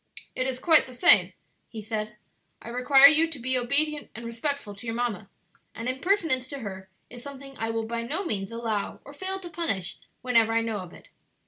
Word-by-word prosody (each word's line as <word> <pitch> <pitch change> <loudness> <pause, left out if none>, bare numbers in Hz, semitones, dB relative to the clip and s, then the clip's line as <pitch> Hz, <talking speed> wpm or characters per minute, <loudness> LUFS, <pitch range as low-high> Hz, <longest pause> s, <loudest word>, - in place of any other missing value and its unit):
"It 255 - -2
is 260 -1 -3
quite 320 +2 +5
the 255 - -11
same," 340 +7 +6 0.4
he 225 - -8
said; 215 0 -5 0.4
"I - - -10
require 260 +3 +5
you 310 +3 +6
to 320 - -6
be 255 +1 -1
obedient 290 +4 0
and 235 +1 -8
respectful 235 0 -3
to 200 +4 -11
your 225 - -3
mamma; 225 -4 -3 0.5
and 230 +2 -6
impertinence 265 -1 0
to 280 +1 -7
her 190 -3 -8 0.2
is 245 0 -10
something 275 0 -11
I 225 - -2
will 225 0 -2
by 230 +1 -3
no 305 +12 -3
means 195 - -3
allow 230 -3 -3
or 280 - -12
fail 380 +5 -4
to 365 - -9
punish 200 - -3 0.3
whenever 230 -3 +3
I 230 - +2
know 225 -2 -3
of 180 -2 -9
it. - - -17
245 Hz, 205 wpm, -26 LUFS, 225-280 Hz, 0.5 s, same